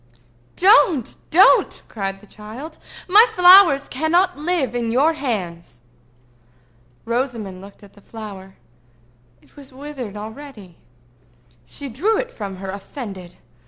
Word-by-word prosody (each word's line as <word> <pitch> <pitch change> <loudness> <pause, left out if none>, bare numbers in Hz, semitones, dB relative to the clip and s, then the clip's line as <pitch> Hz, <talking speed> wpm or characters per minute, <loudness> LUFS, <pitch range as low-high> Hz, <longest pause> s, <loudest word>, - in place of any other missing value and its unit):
"Don't! 365 - +3
don't!" 365 +5 +4
cried 195 -2 -5
the - - -17
child. 220 +10 -11 0.3
"My 420 +6 +6
flowers 360 -6 +6
cannot 345 +7 0
live 300 -5 -2
in 240 -1 -2
your 285 +7 +2
hands." 180 - -5 1.3
Rosamond 230 -6 -4
looked 200 +1 -15
at 200 - -17
the 205 - -20
flower. 200 -3 -11 0.9
It - - -27
was 280 -2 -14
withered 260 -6 -8
already. 215 - -11 0.9
She 280 - -7
threw 345 - -1
it - - -4
from 200 -3 -7
her, 190 0 -7
offended. 195 -3 -9
245 Hz, 120 wpm, -20 LUFS, 200-310 Hz, 1.3 s, My